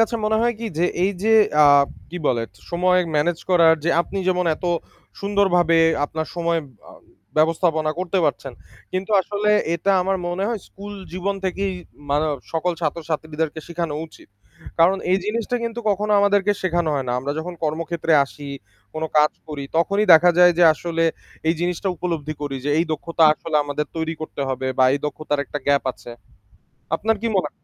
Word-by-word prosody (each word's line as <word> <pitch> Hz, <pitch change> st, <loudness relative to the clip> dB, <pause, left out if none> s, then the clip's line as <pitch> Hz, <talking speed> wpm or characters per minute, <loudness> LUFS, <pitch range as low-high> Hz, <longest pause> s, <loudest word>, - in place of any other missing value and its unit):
কাছে 225 Hz, +1 st, +2 dB
মনে 220 Hz, +1 st, +2 dB
হয় 240 Hz, 0 st, +1 dB
কী 230 Hz, -, -4 dB
যে, 175 Hz, -, +3 dB, 0.2 s
এই 195 Hz, -, +1 dB
যে 225 Hz, +1 st, +3 dB, 0.8 s
কী 180 Hz, -, -6 dB
বলে, 120 Hz, -2 st, +1 dB, 0.3 s
সময় 180 Hz, +1 st, +3 dB, 0.2 s
manage 165 Hz, +3 st, 0 dB
করার 165 Hz, -2 st, +6 dB
যে, 170 Hz, -, +2 dB
আপনি 195 Hz, +3 st, -4 dB
যেমন 180 Hz, -1 st, +1 dB
এত -, -, -11 dB, 0.6 s
সুন্দরভাবে 190 Hz, -5 st, +2 dB, 0.3 s
আপনার 160 Hz, +2 st, -4 dB
সময় 170 Hz, -1 st, 0 dB, 0.3 s
আ -, -, -14 dB, 0.4 s
ব্যবস্থাপনা 160 Hz, 0 st, +2 dB
করতে 185 Hz, +1 st, -1 dB
পারছেন, 140 Hz, -2 st, -2 dB, 0.4 s
কিন্তু 185 Hz, +3 st, -3 dB
আসলে 205 Hz, +3 st, -1 dB, 0.2 s
এটা 180 Hz, +4 st, 0 dB
আমার 190 Hz, +1 st, 0 dB
মনে 185 Hz, +3 st, -2 dB
হয় 230 Hz, -4 st, -2 dB
স্কুলজীবন 200 Hz, -1 st, -5 dB
থেকেই 190 Hz, +1 st, -1 dB, 0.4 s
মানে 150 Hz, +2 st, +2 dB, 0.3 s
সকল 170 Hz, +2 st, 0 dB
ছাত্র-ছাত্রীদেরকে 155 Hz, 0 st, -3 dB
শেখানো 170 Hz, -3 st, -3 dB
উচিত। -, -, -18 dB, 0.5 s
কারণ 175 Hz, +4 st, +5 dB
এই 190 Hz, -, +4 dB
জিনিসটা 230 Hz, +3 st, -1 dB
কিন্তু 230 Hz, +1 st, -4 dB
কখনো 210 Hz, +2 st, 0 dB
আমাদেরকে 205 Hz, 0 st, +3 dB
শেখানো 175 Hz, -3 st, 0 dB
হয় 135 Hz, -3 st, -2 dB
না। -, -, 0 dB
আমরা 135 Hz, +3 st, -3 dB
যখন 175 Hz, +2 st, -5 dB
কর্মক্ষেত্রে 165 Hz, +1 st, -1 dB
আসি, 140 Hz, +1 st, -11 dB, 0.5 s
কোনো 160 Hz, 0 st, -2 dB
কাজ 150 Hz, 0 st, +5 dB, 0.2 s
করি, 145 Hz, -2 st, -5 dB
তখনই 200 Hz, +5 st, +2 dB
দেখা 175 Hz, +2 st, +7 dB
যায় 180 Hz, 0 st, +7 dB
যে 175 Hz, -, +6 dB
আসলে 165 Hz, +1 st, -2 dB, 0.4 s
এই 165 Hz, -, +3 dB
জিনিসটা 180 Hz, +2 st, -1 dB
উপলব্ধি 160 Hz, -3 st, -3 dB
করি, 140 Hz, -2 st, -3 dB
যে 145 Hz, -, 0 dB
এই 165 Hz, -, +3 dB
দক্ষতা 165 Hz, +2 st, +1 dB
আসলে 155 Hz, 0 st, -2 dB
আমাদের 145 Hz, +1 st, -3 dB
তৈরি 160 Hz, 0 st, -2 dB
করতে 155 Hz, -, -6 dB
হবে 130 Hz, 0 st, -3 dB
বা 130 Hz, -, +6 dB
এই -, -, -1 dB
দক্ষতার 150 Hz, -1 st, -2 dB
একটা 145 Hz, -, -5 dB
gap 140 Hz, 0 st, +3 dB
আছে। 120 Hz, -, -13 dB, 0.9 s
আপনার 225 Hz, +1 st, 0 dB
কী 230 Hz, -, 0 dB
মনে 180 Hz, -6 st, +1 dB
হয়? -, -, -39 dB
170 Hz, 170 wpm, -22 LUFS, 155-190 Hz, 0.9 s, দেখা